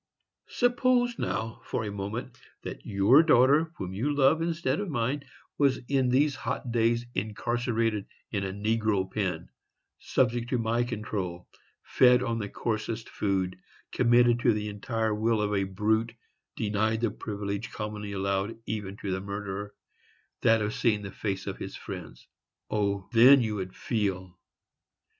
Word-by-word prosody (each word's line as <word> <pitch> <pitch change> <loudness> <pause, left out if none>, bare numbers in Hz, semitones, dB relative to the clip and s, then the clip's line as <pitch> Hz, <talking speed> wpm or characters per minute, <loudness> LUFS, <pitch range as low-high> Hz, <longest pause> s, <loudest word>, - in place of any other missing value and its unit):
Suppose, 245 -1 +2
now, 110 0 -3
for 120 - -2
a 105 - -4
moment, 105 +5 -5 0.3
that - - -7
your 100 +8 +6
daughter, 150 +1 +4
whom 95 -1 -5
you 120 +10 -1
love, 145 +3 +3
instead 170 +2 0
of 205 -2 -3
mine, 135 +1 -1 0.4
was 140 -2 +4
in 135 -2 +2
these 140 +4 +3
hot 125 -1 -4
days 115 +1 +2
incarcerated 115 +1 -1 0.2
in 100 -2 -1
a 95 - -2
negro 105 -2 0
pen, 100 -4 -2 0.5
subject 120 -2 0
to 130 - +1
my 115 +1 +1
control, 100 -7 -4 0.4
fed 125 -1 +5
on 115 -2 -1
the 100 -2 -4
coarsest 110 +1 -3
food, 95 -3 -1 0.3
committed 120 -1 +4
to 120 -1 +3
the 105 0 -3
entire 110 +1 -2
will 110 +1 +1
of 105 0 0
a 100 -1 +1
brute, 110 +4 0 0.4
denied 110 +1 0
the 115 -3 +1
privilege 100 0 -4
commonly 105 -1 -5
allowed 100 +2 -1
even 100 -2 -4
to 100 - -4
the 95 0 -2
murderer—that 100 +2 -3
of 105 +1 -2
seeing 105 -3 +1
the 100 - -6
face 95 -2 -3
of - - -5
his - - -6
friends? - - -9 0.4
O! 100 -2 0
then, 130 +5 +8
you 110 -2 -2
would 95 -1 -5
FEEL! 95 -6 -2
110 Hz, 150 wpm, -28 LUFS, 100-120 Hz, 0.5 s, then